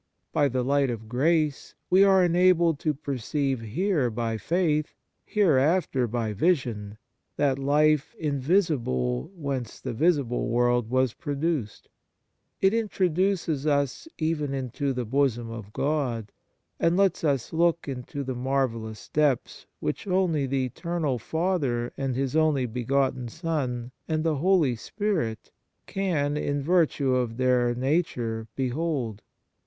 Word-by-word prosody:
By 145 -2 +3
the 130 -1 -1
light 140 +1 +2
of 110 -2 -5
grace 150 +4 0 0.2
we 190 +2 +7
are* 190 -2 +5
enabled 175 -3 +3
to 155 - 0
perceive 135 -1 -2
here 140 - 0
by 115 0 -2
faith, 155 -2 0 0.3
hereafter 155 - +2
by 115 -1 -2
vision, 110 - 0 0.4
that 140 -2 +1
life 150 +1 +2
invisible 140 - 0
whence 135 - -4
the 130 - -4
visible 140 -3 +1
world 120 -1 +2
was 130 -1 +2
produced. 145 -6 -3 0.7
It 195 +1 +4
introduces 185 -7 0
us 140 - 0
even 155 -3 -1
into 135 +2 -2
the 125 -2 -3
bosom 120 -2 0
of 110 -3 -8
God, 125 -7 -1 0.5
and 165 +2 +2
lets 195 -3 +2
us 140 -4 0
look 170 0 +2
into 135 +1 -5
the 130 -1 -3
mysterious 120 -4 -2
depths 145 -5 0
which 75 - -3
only 180 -7 +1
the 135 0 0
Eternal 150 0 -2
Father 145 - -1
and 135 -2 -2
His 135 +1 -1
only 155 -5 +3
begotten 125 +1 0
Son, 130 -7 -3 0.2
and 155 -1 0
the 160 -3 +1
Holy 165 -5 +3
Spirit, 160 - -3 0.3
can 155 -7 -1
in 145 -1 -1
virtue 155 -5 +2
of 120 -3 -1
Their 125 -1 +2
nature 120 -5 -1
behold. 130 -5 -2
140 Hz, 125 wpm, -26 LUFS, 120-160 Hz, 0.7 s, we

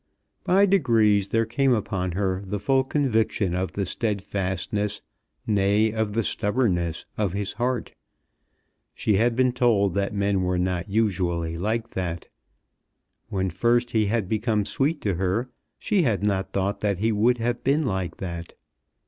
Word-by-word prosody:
By 195 +3 +4
degrees 115 - +3
there 115 +2 +1
came 130 +3 +2
upon 95 -5 -2
her 95 0 -1
the 100 +1 -3
full 135 +5 +2
conviction 115 - 0
of 90 +1 -2
the 100 - -1
steadfastness, 100 0 -2 0.5
nay, 105 +1 +2
of 110 -2 -1
the 115 +1 +1
stubbornness, 95 -8 0
of 100 -4 0
his 100 0 -3
heart. 120 +1 -2 1.0
She 105 -3 +1
had 115 +2 +2
been 130 0 +3
told 115 -6 +2
that 100 +1 0
men 100 -1 0
were 90 0 0
not 90 +1 -1
usually 90 -6 0
like 110 +6 -2
that. 85 -3 -4 1.0
When 95 -2 -1
first 120 +6 +1
he 110 -2 +2
had 110 -2 0
become 110 0 0
sweet 145 +8 0
to 100 - 0
her, 95 +8 -1 0.3
she 205 -4 +1
had 110 - +1
not 95 -2 0
thought 100 +1 -1
that 100 -3 0
he 110 +4 +1
would 115 +4 +3
have 120 +1 -2
been 145 +3 +2
like 95 -7 -2
that. 85 -2 -6
105 Hz, 155 wpm, -25 LUFS, 95-115 Hz, 1.0 s, By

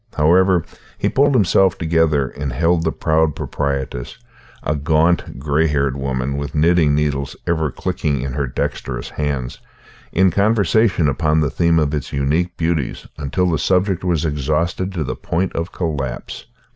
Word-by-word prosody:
However, 90 +3 +4 0.3
he - - 0
pulled 140 0 +3
himself 95 -3 +3
together 80 -4 +2
and 70 0 -5
held 80 +6 +1
the 80 - +1
proud 80 -1 +1
proprietress, 70 -3 -3 0.5
a 75 - 0
gaunt, 80 +4 +1
grey 75 +4 +1
haired 70 -3 0
woman 70 0 -2
with 70 +1 -5
knitting 80 -1 +3
needles 70 -2 -1
ever 80 -3 0
clicking 70 0 -2
in 70 -2 -4
her 70 0 -1
dexterous - - -4
hands, 70 -5 -3 0.5
in 95 +1 +3
conversation 100 -2 +2
upon 75 +2 +1
the 75 - 0
theme 85 -1 +2
of 75 -2 +1
its 75 -3 -3
unique 75 +6 0
beauties 80 -5 -1
until 75 +6 0
the 80 -4 0
subject 95 +3 +1
was 85 -4 0
exhausted 80 +5 -1
to 85 -4 -2
the - - -4
point 90 +3 -2
of 85 +2 -3
collapse. 70 -8 -4
80 Hz, 155 wpm, -19 LUFS, 70-85 Hz, 0.5 s, However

